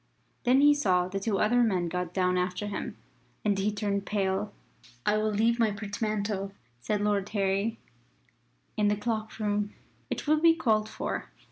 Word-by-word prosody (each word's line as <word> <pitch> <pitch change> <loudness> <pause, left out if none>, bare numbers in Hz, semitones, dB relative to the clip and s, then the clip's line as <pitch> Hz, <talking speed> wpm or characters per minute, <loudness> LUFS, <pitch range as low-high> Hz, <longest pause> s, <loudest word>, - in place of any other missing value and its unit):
Then 255 +3 +5
he 290 0 +7
saw 185 -11 +2
the 195 +1 -3
two 200 0 0
other 240 +5 +3
men 190 -7 +2
got 180 0 -3
down 180 0 +1
after 180 +2 -1
him, 205 -1 -4 0.5
and 205 -1 +3
he 205 +2 +1
turned 200 -1 -1
pale. 200 0 -1 0.5
"I 210 - +3
will 215 0 +1
leave 225 +3 +2
my 225 -2 +4
portmanteau," 205 -1 -2 0.3
said 205 - -1
Lord 205 -1 +1
Harry, 200 +2 0 1.0
"in 210 -1 +2
the 210 0 +2
cloak 220 0 -3
room. 210 -1 -1 0.3
It - - -3
will 305 +1 +3
be 330 0 +6
called 215 -8 +1
for." - - -4
210 Hz, 165 wpm, -29 LUFS, 195-220 Hz, 1.0 s, he